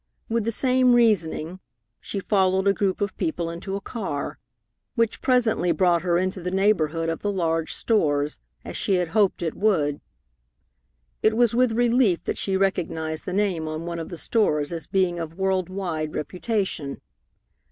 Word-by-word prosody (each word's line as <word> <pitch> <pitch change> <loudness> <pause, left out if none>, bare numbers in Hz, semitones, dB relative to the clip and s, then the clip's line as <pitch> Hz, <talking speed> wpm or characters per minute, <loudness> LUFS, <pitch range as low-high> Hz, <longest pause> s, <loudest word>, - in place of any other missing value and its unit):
With 230 -1 -1
the 230 - 0
same 255 +1 +3
reasoning, 185 -6 +1 0.4
she 200 - -5
followed 190 -1 +2
a 200 - +5
group 195 -1 -1
of 200 -1 -1
people 175 - -2
into 180 +3 -5
a 200 - -4
car, 190 -11 -4 0.6
which 230 -3 0
presently 230 -8 +2
brought 170 +1 +3
her 175 -1 +1
into 185 +1 -1
the 180 - -2
neighborhood 170 -5 +1
of 165 0 -2
the 205 - 0
large 165 -4 0
stores, 150 -9 +1 0.3
as - - -7
she 195 - +1
had 180 -2 0
hoped 200 -2 +2
it 165 - -1
would. 155 -9 +1 1.2
It 220 +1 +3
was 240 -2 +4
with 245 -1 +3
relief 235 -5 +3
that - - -3
she 195 -1 0
recognized 160 -5 -1
the 180 - -4
name 190 -5 0
on 155 +1 -4
one 170 -1 -4
of 165 - -6
the 175 - -7
stores 155 -8 +1
as 165 -2 -5
being 185 -3 +1
of 165 0 -6
world 190 -2 0
wide 170 -5 -3
reputation. 180 -5 -2
185 Hz, 170 wpm, -24 LUFS, 165-210 Hz, 1.2 s, a